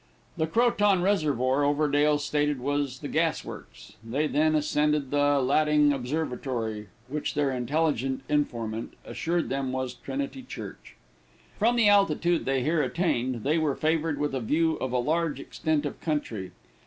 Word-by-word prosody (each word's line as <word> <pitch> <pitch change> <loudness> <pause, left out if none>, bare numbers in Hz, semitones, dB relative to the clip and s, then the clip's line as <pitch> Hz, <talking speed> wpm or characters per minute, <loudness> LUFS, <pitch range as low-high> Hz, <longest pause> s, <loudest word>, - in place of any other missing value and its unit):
The 160 - 0
Croton 205 -3 +3
Reservoir, 145 - +1
Overdale 145 0 +2
stated 145 -1 0
was 140 0 -2
the 145 - -4
gas 160 0 0
works. - - -11
They 130 +7 -1
then 155 +1 +2
ascended 150 -2 +1
the 145 0 +3
Latting 150 +2 +3
Observatory, 125 -6 -3 0.2
which 150 +3 -3
their 145 -2 +1
intelligent 135 0 -1
informant 115 -7 -2
assured 170 0 -2
them 135 -1 -2
was 130 -1 -3
Trinity 270 - -5
Church. 255 - -9 0.6
From 230 +3 +3
the 230 -3 +4
altitude 175 -4 +3
they 135 -1 +1
here 155 +3 +2
attained, 130 -6 -1
they 155 +3 +2
were 150 -4 0
favored 160 -1 0
with 145 -1 -1
a 135 - -1
view 160 +7 +1
of 130 - -3
a 125 - +1
large 155 +3 0
extent 155 +1 -1
of 145 - -5
country. 115 - -2
145 Hz, 150 wpm, -27 LUFS, 130-160 Hz, 0.6 s, the